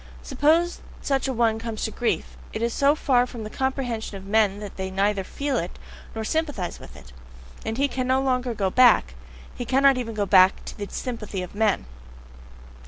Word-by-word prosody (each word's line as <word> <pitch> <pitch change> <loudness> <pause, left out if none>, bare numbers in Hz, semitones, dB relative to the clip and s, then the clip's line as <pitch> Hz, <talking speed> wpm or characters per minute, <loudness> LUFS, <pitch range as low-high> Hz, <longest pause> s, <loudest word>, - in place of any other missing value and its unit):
Supposing 315 +5 +1 0.2
such 275 -1 0
a - - 0
one 225 -2 +2
comes 225 -1 -5
to 220 - -1
grief, 240 - -2 0.2
it 220 - -3
is 235 0 0
so 280 +1 +3
far 250 -5 +2
from 235 -3 -7
the 215 - -7
comprehension 245 -6 -2
of 190 - -11
men 205 -1 +2
that 205 -2 -8
they 190 0 -4
neither 195 +1 0
feel 280 +6 -2
it, 175 -2 -4 0.4
nor 220 - -3
sympathize 290 - -2
with 65 - -13
it. 65 -3 -14 0.5
And 225 +1 -3
he 280 +1 +2
cannot 260 -1 0
any - - -3
longer 250 -2 0
go 195 -3 0
back! 245 - +5 0.4
He - - -5
cannot 270 +2 +4
even 230 -3 -4
go 205 -1 0
back 185 -1 +6
again - - -18
to - - -8
the 205 - -4
sympathy 215 -7 -4
of 180 - -9
men! 210 - +1
230 Hz, 200 wpm, -24 LUFS, 205-265 Hz, 0.5 s, back